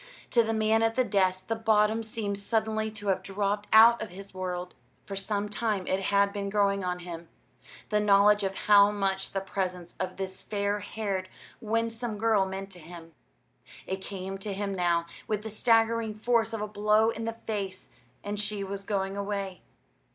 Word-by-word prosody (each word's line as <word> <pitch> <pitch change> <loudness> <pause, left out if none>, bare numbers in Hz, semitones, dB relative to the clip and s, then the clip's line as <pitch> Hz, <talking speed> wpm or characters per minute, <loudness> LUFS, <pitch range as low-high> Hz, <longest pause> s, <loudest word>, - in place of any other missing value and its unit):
To 235 - +5
the 225 -1 -1
man 220 0 +2
at 225 0 +2
the 255 - +3
desk 185 -4 +1
the 225 - -1
bottom 220 0 +3
seemed 215 -2 -4
suddenly 220 +1 0
to 210 -2 -5
have 190 - +1
dropped 205 +1 -2
out 230 +2 +8
of 220 - -4
his 195 +2 -11
world. 180 -1 -4 0.3
For 195 - -6
some 200 +1 -2
time 210 -2 -1
it 190 - 0
had 200 +1 +2
been 200 -1 -3
growing 200 -1 +2
on 180 0 -1
him 170 -1 -8 0.6
the 210 - +2
knowledge 205 0 +5
of 195 -1 -2
how 205 -1 +7
much 195 -2 -1
the 195 - -2
presence 185 -3 -4
of 185 - -3
this 190 -1 -5
fair 205 0 -1
haired, 195 -2 -3 0.3
winsome 230 0 -2
girl 215 -3 +3
meant 195 +1 -6
to 180 - -10
him. 165 0 -11 0.7
It 190 0 -4
came 195 0 -6
to 200 +1 -4
him 200 0 -2
now 175 -2 +1 0.2
with 210 -1 -1
the 220 - -6
staggering 225 0 +2
force 225 0 +1
of 225 -2 -4
a 210 - -2
blow 210 +2 +3
in 225 0 -5
the 230 0 -4
face 195 -4 -4 0.3
and 205 0 -3
she 210 -1 -2
was 195 0 -5
going 195 -1 -2
away. 200 -3 -3
205 Hz, 185 wpm, -28 LUFS, 195-220 Hz, 0.7 s, out